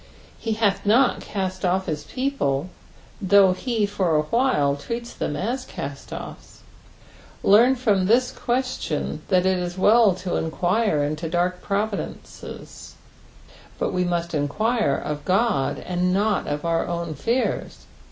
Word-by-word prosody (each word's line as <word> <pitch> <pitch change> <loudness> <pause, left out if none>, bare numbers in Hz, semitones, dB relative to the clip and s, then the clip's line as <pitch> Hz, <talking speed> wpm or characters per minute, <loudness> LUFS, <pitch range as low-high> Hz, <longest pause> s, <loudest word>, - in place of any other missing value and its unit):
He 225 - -2
hath 215 -3 +1
not 240 +5 +3
cast 185 -2 -4
off 185 +1 +1
his 155 -4 -4
people, 185 - -1 0.5
though 195 0 +5
he 225 +2 -1
for 195 -5 0
awhile 150 - +2
treats 235 +11 -6
them 145 - -3
as 240 - -2
caet'Offs. 140 - -8 0.8
Lesrn 240 +6 +5
from 205 -7 +2
this 250 +4 +3
question 255 +1 -2
that 185 -1 +3
it 190 -1 +2
is 175 0 -4
well 210 0 +5
to 180 -1 -3
enquire 175 0 +1
into 155 +3 -3
dark 180 +2 0
providences, 200 0 -5 0.8
but - - -1
we 180 0 +1
must 170 -1 -2
enquire 160 - +1
of 150 -1 -4
Qod, 190 - 0
not 195 +3 +1
of 145 +2 -3
our 165 0 0
own 170 -2 -3
fears. 230 - -2
190 Hz, 130 wpm, -23 LUFS, 170-225 Hz, 0.8 s, though